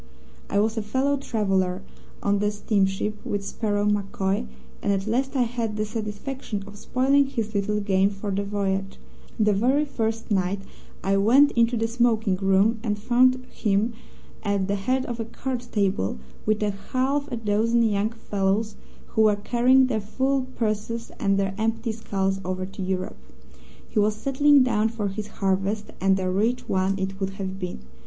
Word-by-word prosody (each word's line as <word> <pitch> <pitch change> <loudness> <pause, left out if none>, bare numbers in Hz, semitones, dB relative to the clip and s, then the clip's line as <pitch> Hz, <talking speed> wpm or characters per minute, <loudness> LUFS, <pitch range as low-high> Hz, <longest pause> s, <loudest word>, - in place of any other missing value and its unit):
"I 200 - +2
was 220 +2 +1
a - - +1
fellow 260 +7 +1
traveller, 195 -7 0 0.4
on 200 0 +2
the 205 0 +2
steamship, 210 0 0
with 200 -1 -3
Sparrow 205 -1 -1
MacCoy, 195 - 0 0.3
and - - +1
at 195 -1 0
least 265 +5 0
I 255 - +4
had 230 -3 -2
the 215 - 0
satisfaction 215 +1 -4
of 205 0 -11
spoiling 270 +6 +2
his 225 -5 -3
little 210 +1 0
game 195 -1 +2
for 200 0 -5
the 200 +1 0
voyage. 195 -1 -2 0.4
The 210 -1 +4
very 260 +9 +2
first 225 -4 -3
night 195 0 +1 0.4
I 195 +1 +2
went 255 +9 +5
into 235 0 +2
the 225 0 +1
smoking 225 -4 +2
room, 195 +4 +3
and 210 -3 -1
found 255 +3 +3
him 210 +2 +1 0.5
at 200 -2 0
the 200 - 0
head 255 +7 0
of 240 -1 -5
a 225 - -2
card 245 +2 -4
table, 190 - 0 0.3
with 215 0 +2
a 205 - +1
half 265 +8 -1
a 240 - -2
dozen 225 +2 +2
young 210 -1 +1
fellows 210 -1 -1 0.3
who 220 - +1
were 215 -1 +5
carrying 245 +5 +4
their 225 -4 -1
full 265 +5 0
purses 220 +1 -2
and 195 -2 +2
their 195 -1 0
empty 225 +1 0
skulls 195 -3 -1
over 185 +1 -3
to 195 +1 -8
Europe. 185 +1 -3 0.7
He 215 - -1
was 210 +1 +3
settling 275 +4 +4
down 225 -3 +2
for 215 -3 -2
his 205 +2 -5
harvest, 195 +2 -1
and 195 0 +3
a 185 - -1
rich 215 +7 0
one 190 +1 +1
it 190 0 -3
would 195 -1 -2
have 190 0 -4
been. 180 - -5
210 Hz, 175 wpm, -25 LUFS, 195-235 Hz, 0.7 s, went